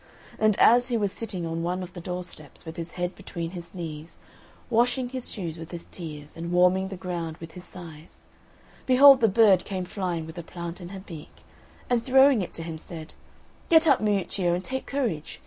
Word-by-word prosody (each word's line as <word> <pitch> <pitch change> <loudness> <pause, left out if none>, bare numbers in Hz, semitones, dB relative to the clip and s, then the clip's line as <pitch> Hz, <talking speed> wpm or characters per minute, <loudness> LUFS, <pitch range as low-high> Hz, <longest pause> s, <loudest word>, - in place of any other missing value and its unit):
And 215 -2 +3
as 245 +2 +6
he 240 -3 0
was 205 -3 0
sitting 190 -6 -4
on 165 0 -3
one 180 +2 -2
of 180 - -9
the 175 - -8
door 180 +1 -4
steps, 155 -4 -11
with 160 0 -7
his 170 -1 -6
head 180 0 -2
between 170 -4 -6
his 175 0 -9
knees, 160 -2 -7 0.5
washing 245 +2 +2
his 255 -1 -6
shoes 170 -6 -5
with 165 - -8
his 170 -1 -8
tears 150 -4 -9
and 170 +1 -5
warming 180 +2 +4
the 190 -1 -7
ground 170 -3 -4
with 165 -1 -10
his 180 +2 -11
sighs, 165 -3 -12 0.6
behold 270 0 +8
the 225 - +6
bird 200 -3 +5
came 185 -2 -4
flying 175 -4 -3
with 160 +2 -8
a - - -6
plant 170 +2 -7
in 175 - -8
her 195 0 -8
beak, 165 -5 -11 0.4
and 240 -2 +1
throwing 265 -2 +5
it 180 - -4
to 165 - -6
him, 160 -1 -6
said, 160 -1 -9 0.6
"Get 325 0 +6
up, - - +5
Miuccio, 195 -4 +1
and 180 - -4
take 265 +3 -4
courage! 230 - -2
180 Hz, 205 wpm, -26 LUFS, 165-215 Hz, 0.6 s, behold